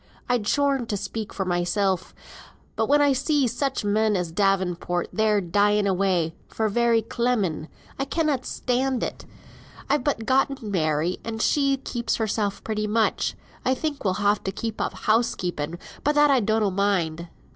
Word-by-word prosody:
I'd 245 Hz, -4 st, 0 dB
scorn 275 Hz, -3 st, +1 dB
to 205 Hz, -, -1 dB
speak 210 Hz, +2 st, -5 dB
for 190 Hz, -, -3 dB
mysel; 180 Hz, +2 st, +1 dB, 0.8 s
but -, -, 0 dB
when 290 Hz, +1 st, +5 dB
I 285 Hz, -1 st, +4 dB
see 280 Hz, +1 st, +1 dB
such 250 Hz, 0 st, -1 dB
men 215 Hz, +1 st, +2 dB
as 180 Hz, -3 st, -2 dB
Davenport 180 Hz, -2 st, 0 dB
there 215 Hz, -1 st, +2 dB
dying 205 Hz, +3 st, +2 dB
away, 185 Hz, -4 st, +1 dB
for 220 Hz, -1 st, -1 dB
very 230 Hz, +1 st, +2 dB
clemming, 220 Hz, -10 st, -1 dB, 0.3 s
I 275 Hz, -, 0 dB
cannot 295 Hz, -3 st, 0 dB
stand 255 Hz, 0 st, -1 dB
it. -, -, -5 dB, 0.7 s
I've 290 Hz, -3 st, +2 dB
but 265 Hz, -6 st, -1 dB
gotten 265 Hz, -3 st, +1 dB
Mary, 155 Hz, -1 st, 0 dB
and 225 Hz, -1 st, -5 dB
she 275 Hz, +3 st, +2 dB
keeps 240 Hz, -2 st, -2 dB
hersel 215 Hz, -2 st, 0 dB
pretty 215 Hz, -1 st, -2 dB
much. 220 Hz, +1 st, +1 dB, 0.3 s
I 260 Hz, -, +2 dB
think 295 Hz, +1 st, -3 dB
we'll 190 Hz, -3 st, +1 dB
ha' 205 Hz, +1 st, +2 dB
to 195 Hz, -, -2 dB
give 220 Hz, +2 st, -4 dB
up -, -, -1 dB
house 225 Hz, +2 st, +1 dB
keeping; 170 Hz, -2 st, -3 dB, 0.3 s
but 295 Hz, +1 st, +2 dB
that 295 Hz, -1 st, +5 dB
I 270 Hz, -, +5 dB
donnot 215 Hz, -2 st, +1 dB
mind." 175 Hz, -4 st, 0 dB
215 Hz, 165 wpm, -25 LUFS, 190-255 Hz, 0.8 s, when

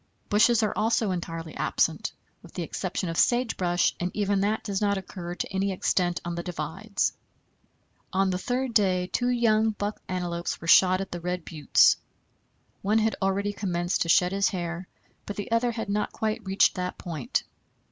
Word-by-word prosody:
Bushes 220 Hz, +2 st, +4 dB
are 210 Hz, -, +1 dB
also 220 Hz, -1 st, +1 dB
entirely 165 Hz, -2 st, -5 dB
absent, -, -, 0 dB, 0.3 s
with -, -, -16 dB
the -, -, -2 dB
exception 185 Hz, -, -3 dB
of 165 Hz, 0 st, -3 dB
sage 240 Hz, -1 st, +3 dB
brush, 175 Hz, -1 st, +1 dB
and 180 Hz, -, -1 dB
even 200 Hz, -1 st, +1 dB
that 210 Hz, +2 st, 0 dB
does 200 Hz, -2 st, -2 dB
not 200 Hz, -1 st, +2 dB
occur 175 Hz, -2 st, -6 dB
to -, -, -4 dB
any 195 Hz, +1 st, 0 dB
extent 180 Hz, -2 st, 0 dB
on 175 Hz, -, -2 dB
the 170 Hz, -, -3 dB
divides. 180 Hz, +5 st, -2 dB, 1.0 s
On 195 Hz, 0 st, +2 dB
the 180 Hz, -, -1 dB
third 250 Hz, +4 st, -2 dB
day 185 Hz, -4 st, +3 dB
two 245 Hz, +6 st, -1 dB
young 225 Hz, -3 st, +3 dB
buck 205 Hz, -1 st, -4 dB
antelopes 175 Hz, -2 st, -3 dB
were -, -, -9 dB
shot 185 Hz, +2 st, +6 dB
at 195 Hz, -, -6 dB
the 175 Hz, -, -5 dB
Red 180 Hz, 0 st, -3 dB
Buttes. 155 Hz, -3 st, +4 dB, 0.8 s
One 210 Hz, +3 st, +2 dB
had 220 Hz, 0 st, +2 dB
already 200 Hz, +1 st, 0 dB
commenced 175 Hz, -3 st, -1 dB
to 170 Hz, -, 0 dB
shed 180 Hz, +2 st, +4 dB
his 195 Hz, 0 st, +2 dB
hair, 175 Hz, -1 st, -4 dB, 0.4 s
but 205 Hz, -, -4 dB
the 205 Hz, +2 st, -5 dB
other 235 Hz, +1 st, +2 dB
had 225 Hz, -2 st, -4 dB
not 205 Hz, +1 st, -1 dB
quite 220 Hz, +1 st, -2 dB
reached 190 Hz, +1 st, +3 dB
that 180 Hz, -1 st, -4 dB
point. 160 Hz, -8 st, -2 dB
195 Hz, 180 wpm, -27 LUFS, 175-215 Hz, 1.0 s, shot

